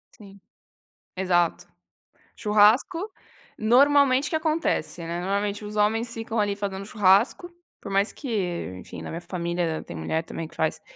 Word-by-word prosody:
Sim. 200 -2 -15 0.8
Exato. 175 -2 +1 0.7
Churrasco, 225 - +3 0.5
normalmente 275 +4 +4
o - - -4
que - - 0
acontece, 315 - -1
né? 170 +1 -3
Normalmente 200 +2 -1
os 210 0 -7
homens 220 +3 +1
ficam 225 0 -3
ali, 205 -1 +1
fazendo 195 -1 -4
churrasco, 210 - +3 0.3
por 200 - -8
mais 195 +2 +2
que 275 - -8 0.5
enfim, - - -9
na - - -6
minha 165 - -5
família 170 -2 -2
tem - - -9
mulher 80 - -2
também 165 0 -6
que - - -19
faz. 160 -1 -1
205 Hz, 150 wpm, -25 LUFS, 180-235 Hz, 0.8 s, normalmente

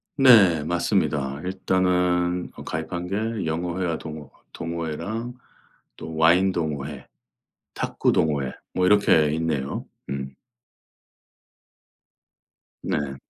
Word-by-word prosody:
네 100 - +6
맞습니다. 75 -4 0
일단은 90 -1 +1
어 - - -9
가입한 85 +3 -4
게 110 +1 -2
영어 85 +3 -2
회화 85 -3 0
동호 75 -2 -8 0.2
동호회랑 85 +9 -4 0.6
또 80 -1 -8
와인 90 +4 +5
동호회, 75 -5 -4 0.7
탁구 - - 0
동호회 70 -4 +1 0.2
뭐 90 - +1
이렇게 90 -7 +4
있네요. 75 -4 -2 0.2
음. 70 -1 -5 2.5
네. 70 -2 -2
85 Hz, 195 characters per minute, -24 LUFS, 75-90 Hz, 2.5 s, 네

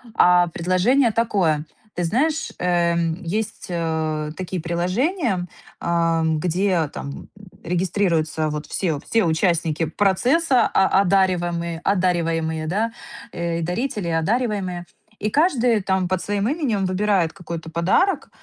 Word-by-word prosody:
А 180 0 +5
предложение 185 +10 +2
такое. 185 -10 +1 0.3
Ты 175 -1 -1
знаешь, 305 - 0
эм, 170 -1 +1
есть, 210 +6 -4
а, 160 -3 -2
такие 185 -2 -4
приложения, 185 - -1 0.3
ам, 165 -2 +1
где 180 -1 +1
там, 140 - -6
м, - - -10 0.3
регистрируются 170 -3 0
вот 150 0 -5
все 160 -7 -1
все 225 -4 +2
участники 165 -1 +1
процесса, 245 - +2
о 190 0 +3
одаривамые 175 -3 0
одариваемые, 165 -4 0
да, 220 +6 -1 0.4
э, 170 -1 -2
и - - -3
дарители 205 +2 -2
одариваемые, 185 0 -1 0.3
и 215 - -1
каждый 250 - +2
там 190 -1 0
под 185 -1 0
своим 205 +2 -1
именем 255 - 0
выбирает 185 -3 +1
какой-то 170 -4 -7
подарок, 185 - +1
180 Hz, 120 wpm, -22 LUFS, 165-205 Hz, 0.4 s, А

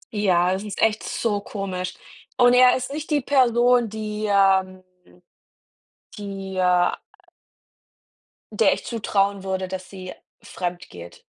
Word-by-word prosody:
Ja, 185 -3 +2
das 190 - -3
ist 210 -2 -7
echt 220 -1 +2
so 205 -3 -2
komisch. 185 -3 -5 0.4
Und 245 0 +5
er 250 0 +6
ist 255 +2 -6
nicht 300 +1 -6
die 295 -2 +1
Person, 245 -3 +3
die, 215 0 -5
ähm 190 -1 +2 1.3
die, 195 -2 -7
äh 180 -1 +3 1.6
der - - +4
ich - - -7
zutrauen 200 -4 -1
würde, 190 -1 -3
dass 185 0 -7
sie 185 -2 -9 0.3
fremdgeht. 175 - -7
195 Hz, 120 wpm, -23 LUFS, 185-230 Hz, 1.6 s, er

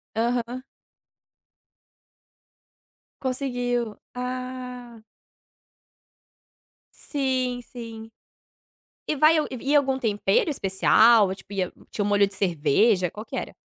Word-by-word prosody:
Aham. 240 +2 -1 2.6
Conseguiu. 245 -4 -2 0.2
Ah. 250 -1 -6 1.9
Sim, 255 -3 -1
sim. 225 -2 -9 1.0
E 305 - 0
vai 310 +3 +5
eu 305 - +1
e - - -4 0.2
e - - +4
algum 270 -2 +2
tempero 250 - +1
especial 215 -2 +4
tipo 200 - -13
ia 185 -2 -1 0.2
tinha 205 - -2
um 200 - -1
molho 205 -1 +4
de 195 - -12
cerveja 180 +2 +2
qual 215 +2 -9
que - - -7
era? - - -5
240 Hz, 100 wpm, -25 LUFS, 210-255 Hz, 2.6 s, vai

